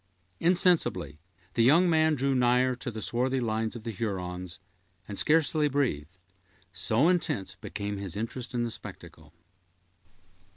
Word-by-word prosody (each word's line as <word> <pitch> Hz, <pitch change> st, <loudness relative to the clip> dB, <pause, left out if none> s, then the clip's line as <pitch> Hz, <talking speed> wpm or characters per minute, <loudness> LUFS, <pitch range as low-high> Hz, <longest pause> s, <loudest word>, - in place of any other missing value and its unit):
Insensibly 170 Hz, -, +2 dB, 0.3 s
the -, -, +1 dB
young 155 Hz, +10 st, +5 dB
man 160 Hz, -2 st, +3 dB
drew 135 Hz, 0 st, 0 dB
nigher 125 Hz, 0 st, +3 dB
to 125 Hz, -, -5 dB
the 110 Hz, -2 st, -6 dB
swarthy 125 Hz, +7 st, 0 dB
lines 110 Hz, -1 st, -1 dB
of 115 Hz, -, -8 dB
the 115 Hz, -, -4 dB
Hurons, 90 Hz, -4 st, -4 dB, 0.5 s
and 100 Hz, -, -6 dB
scarcely 155 Hz, +2 st, +3 dB
breathed, 95 Hz, -, -1 dB, 0.6 s
so 110 Hz, -, +2 dB
intense 170 Hz, -, 0 dB
became 100 Hz, 0 st, -4 dB
his 100 Hz, -2 st, -5 dB
interest 120 Hz, +3 st, -5 dB
in 120 Hz, -, +1 dB
the 120 Hz, -, -3 dB
spectacle. 75 Hz, -7 st, -11 dB
120 Hz, 135 wpm, -28 LUFS, 100-140 Hz, 0.6 s, young